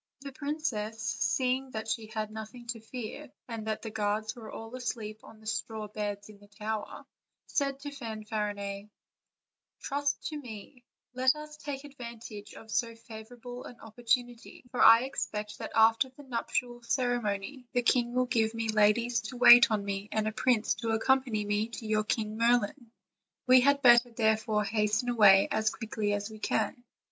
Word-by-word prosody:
The 280 0 -7
princess, 260 -7 -3 0.2
seeing 260 +1 +1
that 220 0 -4
she 220 0 -2
had 215 -1 -4
nothing 220 +2 -8
to 230 -1 -3
fear, 245 +5 -7 0.2
and 225 -2 -6
that 215 0 -2
the 220 - -5
guards 215 +1 -1
were 230 -3 -10
all 225 +2 -8
asleep 220 -4 -5
on 220 - -14
the 220 - -18
straw 220 0 -3
beds 205 -1 -4
in 210 -1 -14
the 205 - -18
tower, 215 +1 -5 0.4
said 275 -1 -1
to 290 0 -6
Fanfarinet: 210 -5 -4 0.9
"Trust 285 0 -2
to 305 - -5
me; 245 0 -10 0.3
let 255 +2 +3
us 300 0 -9
take 285 -2 -6
advantage 235 -6 -9
of 220 - -12
so 230 +1 0
favorable 230 +2 -10
an 245 - -11
opportunity; 240 +1 -2
for 250 - -1
I 230 +1 +9
expect 210 -5 -4
that - - -6
after 225 +4 +5
the 260 +3 -15
nuptial 240 -1 -3
ceremony 240 0 -1
the 245 -1 +1
king 240 0 +2
will 255 0 +3
give 225 -2 +1
me 225 -1 -2
ladies 215 +3 +3
to 250 - -8
wait 240 -1 +9
on 210 -2 0
me, 200 +1 -4
and 215 0 0
a - - 0
prince 230 -2 +2
to 230 - -2
accompany 235 -2 +1
me 210 +1 0
to 230 0 -8
your 215 0 +1
King 215 -1 -2
Merlin; 240 +1 +1 0.6
we 255 0 +7
had 280 +2 +3
better 240 0 +7
therefore 220 -2 +1
hasten 210 +3 0
away 205 -5 +6
as 215 0 +2
quickly 215 -2 -3
as 205 0 -2
we 215 -1 -11
can." 245 +3 -1
225 Hz, 170 wpm, -30 LUFS, 215-250 Hz, 0.9 s, I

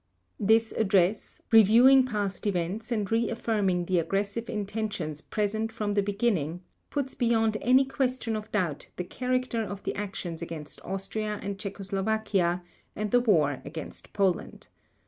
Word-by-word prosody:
This 220 +2 +3
address, 195 -1 +1
reviewing 240 +5 +7
past 205 -3 -2
events 195 +5 -2
and 210 -4 -1
re 225 0 +2
affirming 205 -6 0
the 180 0 +2
aggressive 200 +7 -2
intentions 205 -7 -3
present 220 +3 -1
from 210 -2 -2
the 205 - +3
beginning, 195 -5 -1 0.3
puts 280 -2 -2
beyond 225 -3 +2
any 260 +2 +5
question 255 -4 -1
of 215 0 -6
doubt 175 -9 -1
the 180 - -3
character 255 +3 -1
of 200 -2 -5
the - - -2
actions 185 -5 -5
against 160 -3 -7
Austria 205 +2 -3
and 200 0 -4
Czechoslovakia, 195 -2 -1 0.3
and 210 -1 -3
the 245 - +5
war 155 - +2
against 155 +2 -8
Poland. 190 -4 -1
205 Hz, 140 wpm, -28 LUFS, 185-225 Hz, 0.3 s, reviewing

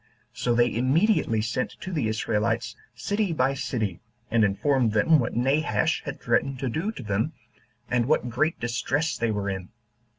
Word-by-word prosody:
So 120 -1 0
they 120 -1 +3
immediately 130 - +2
sent 115 +3 -2
to 190 - -5
the 150 -10 0
Israelites, 110 +1 -1 0.2
city 205 - -1
by 135 -2 +2
city, 110 -9 -3 0.3
and 115 -1 +4
informed 115 +3 +2
them 150 +9 +4
what 120 - -2
Nabash 150 +5 +1
had 145 - -5
threatened 130 +3 0
to 130 0 -2
do 165 - -2
to 130 - -8
them, 110 +9 -1 0.5
and 120 -1 +1
what 150 -4 +2
great 130 +7 0
distress 135 +7 -1
they 115 - 0
were 105 -2 -2
in. 95 -2 -4
120 Hz, 165 wpm, -26 LUFS, 110-145 Hz, 0.5 s, and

